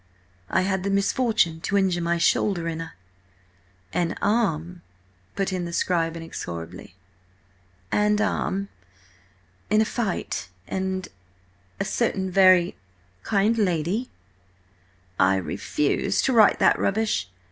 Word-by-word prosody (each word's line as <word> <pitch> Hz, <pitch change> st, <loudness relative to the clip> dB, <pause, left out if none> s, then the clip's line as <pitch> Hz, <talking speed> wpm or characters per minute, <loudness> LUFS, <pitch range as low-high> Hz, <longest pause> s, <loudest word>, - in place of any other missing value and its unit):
'I 185 Hz, -, +2 dB
had 190 Hz, 0 st, -1 dB
the 200 Hz, -, -1 dB
misfortune 200 Hz, -4 st, +1 dB
to 200 Hz, -, 0 dB
injure 185 Hz, -3 st, +1 dB
my 170 Hz, 0 st, 0 dB
shoulder 170 Hz, 0 st, +1 dB
in 165 Hz, 0 st, -3 dB
a—" 165 Hz, -, -8 dB, 1.0 s
"'And 170 Hz, -1 st, -1 dB
arm,'" 180 Hz, -6 st, 0 dB, 0.5 s
put 195 Hz, -1 st, -1 dB
in 180 Hz, -1 st, -2 dB
the 170 Hz, -, -5 dB
scribe, 170 Hz, -1 st, 0 dB
inexorably. 90 Hz, -, -7 dB, 1.0 s
"'And 210 Hz, 0 st, +2 dB
arm, 200 Hz, -2 st, -1 dB, 1.0 s
in 215 Hz, +2 st, +4 dB
a 220 Hz, -, +4 dB
fight... 195 Hz, -, -3 dB, 0.2 s
and 190 Hz, 0 st, -2 dB, 0.7 s
a -, -, -1 dB
certain 190 Hz, -5 st, -1 dB
very... 185 Hz, -2 st, +5 dB, 0.5 s
kind 210 Hz, -, +2 dB
lady—'" 185 Hz, +5 st, 0 dB, 1.1 s
"I 95 Hz, +1 st, +4 dB
refuse 100 Hz, +9 st, -1 dB
to 265 Hz, -, +2 dB
write 220 Hz, -3 st, +6 dB
that -, -, +3 dB
rubbish! 210 Hz, -, 0 dB
185 Hz, 115 wpm, -24 LUFS, 165-205 Hz, 1.1 s, write